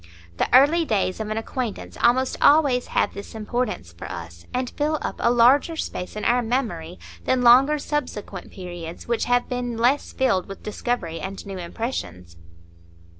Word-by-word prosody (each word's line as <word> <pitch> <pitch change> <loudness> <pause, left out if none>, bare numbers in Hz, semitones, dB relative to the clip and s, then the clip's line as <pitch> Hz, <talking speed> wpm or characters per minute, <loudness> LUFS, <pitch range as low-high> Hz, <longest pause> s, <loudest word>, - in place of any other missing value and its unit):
The - - 0
early 290 +7 +6
days 205 - 0
of 215 -1 -4
an 215 - -2
acquaintance 225 -1 -4
almost 255 +2 +3
always 285 -4 +4
have - - 0
this 200 +2 -9
importance 215 - -3
for 85 - -9
us, 85 0 -9
and 250 0 -1
fill 305 +1 0
up - - -4
a - - +3
larger 250 +7 +4
space 180 - -5
in 210 - -4
our 245 +1 +3
memory 220 -9 -2 0.3
than 255 -1 +2
longer 265 +5 +6
subsequent 250 -10 -4
periods, 175 -3 -8
which 235 -1 0
have 245 0 +2
been 245 -2 -3
less 250 +5 +2
filled 230 -9 +1
with 195 - -9
discovery 205 -6 -3
and 190 0 -6
new 195 -2 -6
impressions. 90 - -5
235 Hz, 165 wpm, -23 LUFS, 185-255 Hz, 0.3 s, early